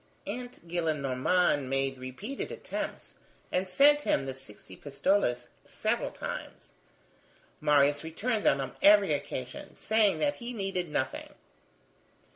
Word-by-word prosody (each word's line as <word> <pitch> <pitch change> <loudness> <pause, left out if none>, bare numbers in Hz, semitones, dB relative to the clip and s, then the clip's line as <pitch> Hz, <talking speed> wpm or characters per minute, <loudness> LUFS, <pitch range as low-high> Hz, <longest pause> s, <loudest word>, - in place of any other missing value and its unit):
Aunt 245 -4 -7
Gillenormand 155 -1 +1
made 135 -1 -1
repeated 160 - -6
attempts, - - -6 0.4
and 185 +1 0
sent 290 +8 +6
him 135 - +1
the 135 - -4
sixty 105 -8 -13
pistoles 140 - 0 0.2
several - - -1
times. - - -7 0.9
Marius 145 -1 +3
returned 210 +8 -2
them 140 - +3
on 135 -1 -4
every 200 -4 +6
occasion, 130 -3 -5
saying 220 -2 +3
that 290 -1 0
he 240 0 -6
needed 195 -5 -2
nothing. 130 -3 -3
160 Hz, 115 wpm, -29 LUFS, 135-205 Hz, 0.9 s, sent